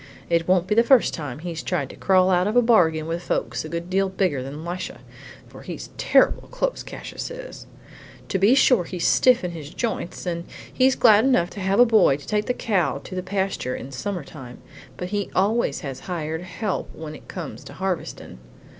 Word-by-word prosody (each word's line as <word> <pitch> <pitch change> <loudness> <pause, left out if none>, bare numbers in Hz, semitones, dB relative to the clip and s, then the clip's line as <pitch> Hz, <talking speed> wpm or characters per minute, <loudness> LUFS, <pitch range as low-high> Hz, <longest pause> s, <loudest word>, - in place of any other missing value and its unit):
It 170 0 +2
won't 180 -1 +3
be 210 - 0
the 230 - +6
first 245 0 +4
time 145 -6 -5
he's 165 0 -5
tried 135 -2 -2
to - - -12
crawl 185 -1 +3
out 180 +1 +3
of 215 - -1
a 245 - +7
bargain 165 -9 +3
with 165 +1 -3
folks 120 -7 -2
a 155 - -7
good 170 +1 -4
deal 195 +1 +1
bigger 185 -8 0
than 140 +4 -7
Lisha, 175 +1 -5 0.5
for - - -13
he's - - -8
terrible - - +3
close, - - -2
Cassius - - -7
is. - - -9 0.6
To 190 - 0
be 205 +7 +5
sure 250 -8 +4
he's 180 0 -3
stiff 250 -4 +4
in 180 - -2
his 155 -4 -8
joints 215 -2 -4
and 170 -1 -3 0.3
he's 260 0 +3
glad 215 -2 +6
enough 215 -10 +2
to - - -8
have 195 +3 +1
a 245 - +9
boy 215 - +4
to 145 - -14
take 210 +4 -1
the 250 - +1
cow 195 - 0
to - - -9
the 185 - -2
pasture 190 -8 -2
in 135 - -8
summer 180 +5 -4
time, 130 -4 -11 0.4
but 180 - -5
he 205 0 -2
always 200 -4 +1
has 135 -3 -6
hired 160 -3 -4
help 185 +3 -4
when 155 -1 -7
it - - -13
comes 175 -4 -7
harvestin'. 185 - -4
185 Hz, 205 wpm, -23 LUFS, 160-210 Hz, 0.6 s, a